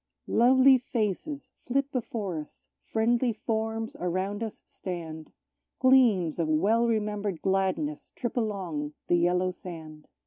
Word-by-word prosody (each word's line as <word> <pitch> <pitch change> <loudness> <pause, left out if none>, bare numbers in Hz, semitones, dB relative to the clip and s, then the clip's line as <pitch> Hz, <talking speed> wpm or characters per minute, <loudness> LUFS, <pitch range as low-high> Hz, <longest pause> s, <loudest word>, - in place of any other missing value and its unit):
Lovely 260 +2 +6
faces 255 - -3
flit 275 +2 -1
before 225 - -3
us, 150 - -12 0.2
friendly 235 +2 +1
forms 225 0 -3
around 185 +4 -2
us 225 -2 -5
stand; 160 -4 -7 0.5
Gleams 235 -11 +4
of 165 - +1
well 205 +10 +3
remembered 210 -4 -1
gladness 195 +11 0
trip 240 - -3
along 185 -10 -2
the 175 - +3
yellow 180 +1 +2
sand. 160 -4 -10
210 Hz, 115 wpm, -28 LUFS, 175-240 Hz, 0.5 s, Lovely